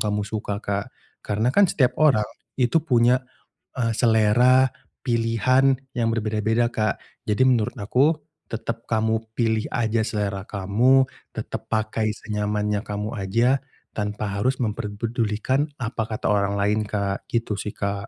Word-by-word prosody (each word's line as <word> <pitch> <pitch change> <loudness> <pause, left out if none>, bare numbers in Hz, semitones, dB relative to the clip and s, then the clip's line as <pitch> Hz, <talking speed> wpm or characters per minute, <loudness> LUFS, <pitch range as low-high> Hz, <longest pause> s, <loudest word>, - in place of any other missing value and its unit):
kamu 105 -1 0
suka, 105 -1 -4
Kak. 100 -1 -2 0.4
Karena 110 +4 0
kan 200 +10 +5
setiap 125 -6 +1
orang 130 -9 +4 0.3
itu 125 +4 +2
punya, 125 -2 +3 0.5
eee, 115 -2 +1
selera 120 +3 +4 0.4
pilihan 125 +3 +3 0.2
yang 115 -2 +1
berbeda-beda, 110 +1 +1
Kak. 110 -1 +1 0.3
Jadi 105 +5 +2
menurut 120 0 +1
aku 135 +9 +2 0.3
tetap 115 0 -4
kamu 110 0 0
pilih 110 -2 +1
aja 115 -1 +1
selera 100 -3 -2
kamu, 115 +7 +3 0.3
tetap - - -5
pakai 110 0 0
senyamannya 105 -1 -1
kamu 105 +1 -4
aja 115 +7 +2 0.3
tanpa 105 -1 -3
harus 130 +5 +2
memper 105 -1 -2
pedulikan 115 +5 0
apa 115 -1 -2
kata 110 - -5
orang 100 0 +1
lain, 105 +2 +2
Kak. 100 -2 -2
Gitu 115 -2 0
sih, 105 0 -5
Kak. 100 0 -3
110 Hz, 135 wpm, -24 LUFS, 105-120 Hz, 0.5 s, kan